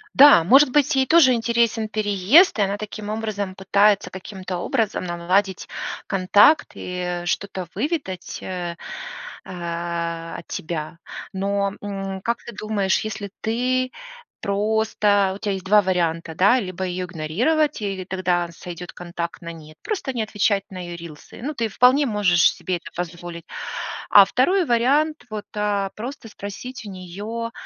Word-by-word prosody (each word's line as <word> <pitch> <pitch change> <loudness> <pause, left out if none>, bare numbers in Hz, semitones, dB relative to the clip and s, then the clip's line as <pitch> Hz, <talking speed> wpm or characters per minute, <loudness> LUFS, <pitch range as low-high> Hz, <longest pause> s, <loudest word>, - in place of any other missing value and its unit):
Да, 280 - +9
может 270 - +6
быть, 295 +2 +3
ей 265 -1 +2
тоже 310 -5 +6
интересен 230 -1 +1
переезд, 215 - +4
и - - +4
она 200 0 +1
таким 210 0 -6
образом 215 -3 -3
пытается 200 +1 +3
каким-то 190 -1 -6
образом 220 0 -1
наладить 180 +3 0 0.4
контакт 205 +10 +4
и 180 -1 -4
что-то 185 0 -2
выведать, 275 - -3
э 175 -2 -4 0.7
э, 170 -1 -4
от 165 - -11
тебя. 160 0 -5 0.3
Но, 200 +1 0
м, 195 -1 -5
как 235 +3 -1
ты 240 - -8
думаешь, 205 -2 0
если 215 -2 -5
ты 255 +3 0 0.5
просто 205 -1 +2
Вот 195 - -5
у - - -21
тя 205 -1 -2
есть 190 -1 -3
2 210 +2 +6
варианта, 170 -3 -1
да: 205 +9 +5
либо 185 -2 -4
ее 180 0 -3
игнорировать, 215 - 0
и 195 -2 -3
тогда 180 -2 0
сойдет 175 +1 -8
контакт 170 -1 -6
на 170 -1 -6
нет, 155 -1 -13
просто 385 -10 -2
не 240 - -1
отвечать 205 -2 +1
на 185 - -7
ее 175 -1 -6
рилсы, 165 +1 -11
ну, 290 +5 -3
ты 230 -3 -1
вполне 255 +7 +4
можешь 205 -7 +4
себе 185 -1 -3
это - - -12
позволить. 175 -1 -6 0.7
А 200 - +9
2 355 - +2
вариант- 280 +5 +2
вот, 210 -1 -5
а, 205 -2 0
просто 235 +1 -7
спросить 220 +4 -8
у 205 - -6
нее: 185 +1 -8
"Вот 230 +1 -4
200 Hz, 150 wpm, -23 LUFS, 180-230 Hz, 0.7 s, Да